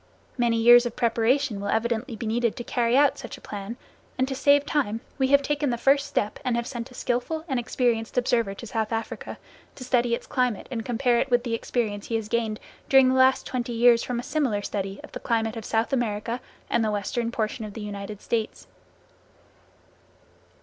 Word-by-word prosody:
Many 235 Hz, -2 st, +2 dB
years 240 Hz, +1 st, +7 dB
of 235 Hz, -, -7 dB
preparation 235 Hz, -1 st, +1 dB
will 200 Hz, -, -3 dB
evidently 235 Hz, +2 st, -1 dB
be 225 Hz, -, -6 dB
needed 230 Hz, +1 st, 0 dB
to 240 Hz, -, -6 dB
carry 240 Hz, +1 st, +1 dB
out 285 Hz, -1 st, +4 dB
such -, -, -8 dB
a -, -, -17 dB
plan, 205 Hz, +3 st, -6 dB, 0.4 s
and 260 Hz, +1 st, +1 dB
to 270 Hz, -, -3 dB
save 285 Hz, +1 st, +4 dB
time 240 Hz, -7 st, -1 dB, 0.2 s
we 265 Hz, -, +3 dB
have 280 Hz, +1 st, +4 dB
taken 295 Hz, 0 st, 0 dB
the 240 Hz, -, -1 dB
first 275 Hz, +3 st, +3 dB
step 210 Hz, -7 st, -2 dB
and 250 Hz, -3 st, 0 dB
have 235 Hz, 0 st, -1 dB
sent 235 Hz, 0 st, -6 dB
a 250 Hz, -, -15 dB
skilful 250 Hz, +7 st, -2 dB
and 265 Hz, -5 st, 0 dB
experienced 235 Hz, -1 st, -1 dB
observer 235 Hz, -5 st, +1 dB
to 235 Hz, -, -9 dB
South 220 Hz, -1 st, -2 dB
Africa 225 Hz, 0 st, -4 dB, 0.4 s
to 255 Hz, -, -8 dB
study 245 Hz, -2 st, +2 dB
its -, -, -10 dB
climate 250 Hz, -5 st, 0 dB
and 230 Hz, -3 st, -3 dB
compare 245 Hz, 0 st, +1 dB
it 270 Hz, -, 0 dB
with 245 Hz, -1 st, +3 dB
the 235 Hz, -2 st, -3 dB
experience 220 Hz, -3 st, -2 dB
he 230 Hz, -, -2 dB
has 220 Hz, -2 st, -2 dB
gained 225 Hz, -2 st, -1 dB, 0.3 s
during 265 Hz, -1 st, +6 dB
the -, -, +2 dB
last 260 Hz, 0 st, +4 dB
twenty 245 Hz, -1 st, -3 dB
years 235 Hz, 0 st, +5 dB
from 245 Hz, -1 st, -3 dB
a -, -, -5 dB
similar 250 Hz, -11 st, 0 dB
study 195 Hz, -1 st, -4 dB
of -, -, -11 dB
the -, -, -6 dB
climate 225 Hz, -1 st, -1 dB
of 225 Hz, -, -6 dB
South 225 Hz, +4 st, 0 dB
America 230 Hz, -1 st, -1 dB, 0.3 s
and 235 Hz, -, +1 dB
the 215 Hz, -, +1 dB
western 210 Hz, +3 st, -2 dB
portion 220 Hz, 0 st, -2 dB
of 210 Hz, -1 st, -8 dB
the 225 Hz, -, -6 dB
United 205 Hz, 0 st, -6 dB
States. 225 Hz, -2 st, -2 dB
235 Hz, 205 wpm, -25 LUFS, 225-255 Hz, 0.4 s, years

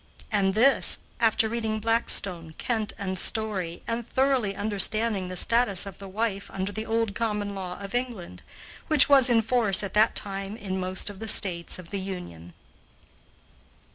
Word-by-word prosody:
And 195 Hz, -2 st, +1 dB
this, 260 Hz, +6 st, +4 dB, 0.2 s
after 225 Hz, -1 st, +2 dB
reading 220 Hz, -1 st, -3 dB
Blackstone, 195 Hz, -7 st, 0 dB
Kent, 220 Hz, -3 st, -2 dB
and 190 Hz, -2 st, -3 dB
Story, 190 Hz, -7 st, 0 dB
and 230 Hz, 0 st, -4 dB
thoroughly 260 Hz, -7 st, 0 dB
understanding 210 Hz, 0 st, 0 dB
the 185 Hz, -, -7 dB
status 205 Hz, -1 st, +3 dB
of 195 Hz, -1 st, -10 dB
the 195 Hz, -, -9 dB
wife 200 Hz, 0 st, -3 dB
under 195 Hz, +1 st, -4 dB
the 220 Hz, +2 st, -6 dB
old 225 Hz, -2 st, -1 dB
common 210 Hz, -2 st, -3 dB
law 185 Hz, -2 st, -6 dB
of 200 Hz, 0 st, -9 dB
England, 245 Hz, -8 st, -5 dB, 0.5 s
which 300 Hz, -3 st, +5 dB
was 270 Hz, -3 st, +6 dB
in 230 Hz, -2 st, +3 dB
force 220 Hz, -4 st, +1 dB
at 195 Hz, -, -6 dB
that 215 Hz, +1 st, +3 dB
time 195 Hz, +1 st, -2 dB
in 190 Hz, -3 st, -5 dB
most 185 Hz, +2 st, -3 dB
of 195 Hz, -, -14 dB
the 225 Hz, -, -7 dB
States 180 Hz, -5 st, +4 dB
of 180 Hz, -2 st, -13 dB
the 200 Hz, -, -3 dB
Union. 90 Hz, -, -8 dB
205 Hz, 165 wpm, -25 LUFS, 190-225 Hz, 0.5 s, was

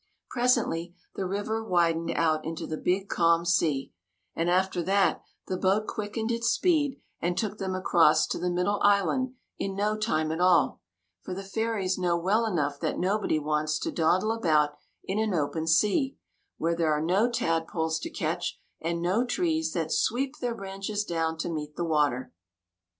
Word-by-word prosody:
Presently, 230 Hz, -9 st, +1 dB, 0.2 s
the 190 Hz, -, -3 dB
river 205 Hz, +4 st, -2 dB
widened 170 Hz, -4 st, +1 dB
out 155 Hz, -2 st, +2 dB
into 160 Hz, 0 st, -4 dB
the 155 Hz, -, -4 dB
big 185 Hz, +5 st, 0 dB
calm 170 Hz, -1 st, +2 dB
sea; 160 Hz, -6 st, +1 dB, 0.4 s
and 165 Hz, +1 st, 0 dB
after 185 Hz, 0 st, +1 dB
that, 195 Hz, +3 st, +2 dB, 0.2 s
the 185 Hz, -, -2 dB
boat 195 Hz, +3 st, +2 dB
quickened 220 Hz, +2 st, -3 dB
its 230 Hz, 0 st, -1 dB
speed 305 Hz, -7 st, +1 dB, 0.2 s
and 175 Hz, +1 st, -1 dB
took 210 Hz, -1 st, -2 dB
them 190 Hz, -1 st, -2 dB
across 170 Hz, -4 st, +4 dB
to -, -, -3 dB
the 180 Hz, -, -1 dB
middle 180 Hz, +4 st, 0 dB
island 205 Hz, +6 st, +2 dB, 0.2 s
in 195 Hz, -1 st, -2 dB
no 210 Hz, +2 st, +1 dB
time 155 Hz, -8 st, 0 dB
at 160 Hz, +2 st, -2 dB
all, 180 Hz, -1 st, +3 dB, 0.4 s
for 185 Hz, -, -6 dB
the 195 Hz, -, -5 dB
fairies 195 Hz, -2 st, -1 dB
know 175 Hz, -2 st, +1 dB
well 205 Hz, +7 st, +1 dB
enough 145 Hz, -8 st, -1 dB
that -, -, -2 dB
nobody 195 Hz, -2 st, +1 dB
wants 155 Hz, 0 st, 0 dB
to -, -, -3 dB
dawdle 185 Hz, +6 st, +2 dB
about 155 Hz, -10 st, +2 dB, 0.3 s
in 195 Hz, +3 st, -2 dB
an 215 Hz, -4 st, 0 dB
open 160 Hz, +1 st, -1 dB
sea, 210 Hz, -, +2 dB, 0.4 s
where 170 Hz, +1 st, 0 dB
there 165 Hz, -2 st, +1 dB
are 150 Hz, -, +2 dB
no 195 Hz, +8 st, +3 dB
tadpoles 165 Hz, -7 st, -1 dB
to -, -, -5 dB
catch -, -, -3 dB, 0.2 s
and 170 Hz, +1 st, -2 dB
no 190 Hz, +7 st, +2 dB
trees 320 Hz, +4 st, 0 dB
that 160 Hz, -2 st, -2 dB
sweep 265 Hz, +5 st, 0 dB
their 240 Hz, -2 st, -2 dB
branches 195 Hz, +1 st, -4 dB
down 165 Hz, -3 st, -1 dB
to 165 Hz, -, -3 dB
meet 150 Hz, -3 st, -4 dB
the 175 Hz, -, -2 dB
water. 145 Hz, -5 st, 0 dB
185 Hz, 170 wpm, -27 LUFS, 165-215 Hz, 0.4 s, across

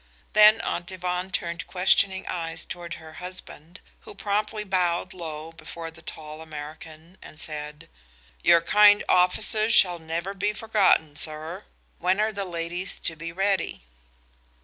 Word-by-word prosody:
Then 215 Hz, +1 st, +7 dB
Aunt 175 Hz, +2 st, -3 dB
Yvonne 180 Hz, 0 st, -3 dB
turned 170 Hz, -3 st, -3 dB
questioning 190 Hz, +1 st, +2 dB
eyes 165 Hz, -2 st, -4 dB
toward 170 Hz, -2 st, -6 dB
her 160 Hz, 0 st, -12 dB
husband, 180 Hz, -2 st, -7 dB, 0.2 s
who -, -, -12 dB
promptly 210 Hz, +1 st, -1 dB
bowed 185 Hz, -1 st, 0 dB
low 160 Hz, -3 st, -7 dB
before 165 Hz, 0 st, -8 dB
the 160 Hz, -, -14 dB
tall 155 Hz, 0 st, -8 dB
American 155 Hz, +2 st, -10 dB
and 155 Hz, -, -13 dB
said: 150 Hz, +1 st, -7 dB, 0.5 s
"Your 170 Hz, -1 st, +6 dB
kind 205 Hz, +3 st, +6 dB
offices 215 Hz, +5 st, +3 dB
shall 175 Hz, -2 st, +5 dB
never 165 Hz, +4 st, -3 dB
be 205 Hz, +2 st, 0 dB
forgotten, 205 Hz, -9 st, +3 dB
sir. 155 Hz, +6 st, -5 dB, 0.3 s
When 185 Hz, +3 st, +1 dB
are 215 Hz, +1 st, +2 dB
the 200 Hz, -2 st, -3 dB
ladies 175 Hz, +1 st, -3 dB
to 160 Hz, -, -2 dB
be 165 Hz, +2 st, -6 dB
ready?" 195 Hz, -, 0 dB
175 Hz, 140 wpm, -26 LUFS, 160-195 Hz, 0.5 s, Then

